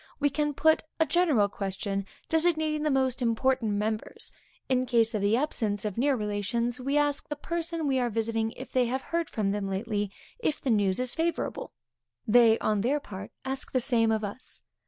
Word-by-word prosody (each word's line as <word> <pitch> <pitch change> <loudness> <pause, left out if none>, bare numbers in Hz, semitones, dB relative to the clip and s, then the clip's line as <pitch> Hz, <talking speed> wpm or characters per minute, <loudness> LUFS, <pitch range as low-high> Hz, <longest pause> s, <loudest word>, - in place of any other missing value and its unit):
We 290 -1 +2
can 295 +1 -1
put 315 +2 +4 0.2
a 320 - +5
general 315 - +3
question, 195 0 -3 0.2
designating 315 -2 +1
the 305 - +1
most 265 -2 +1
important 235 -1 +1
members. 215 +1 -3 0.4
In 255 -1 +1
case 230 -2 +3
of 210 - -1
the 205 +3 +3
absence 220 -7 -1
of 210 -3 -2
near 275 +3 +2
relations, 230 +3 -1
we 275 +3 0
ask 290 -1 0
the 295 - -2
person 335 +1 -3
we 270 -2 +2
are 245 -1 +1
visiting, 225 0 -1
if 260 - -9
they 250 -2 +2
have 260 +2 -2
heard 335 -1 -2
from 205 -3 -1
them 200 -1 -2
lately, 205 +1 -2 0.3
if 310 -10 -1
the 260 - -1
news 200 -2 +2
is 255 -1 0
favorable. 335 +1 -2 0.6
They, 225 0 +6
on 210 -2 0
their 270 +7 +1
part, 200 -7 -8 0.2
ask 265 0 -4
the 255 - +3
same 235 -3 +2
of 220 -1 0
us. 205 +5 -7
245 Hz, 190 wpm, -28 LUFS, 210-290 Hz, 0.6 s, They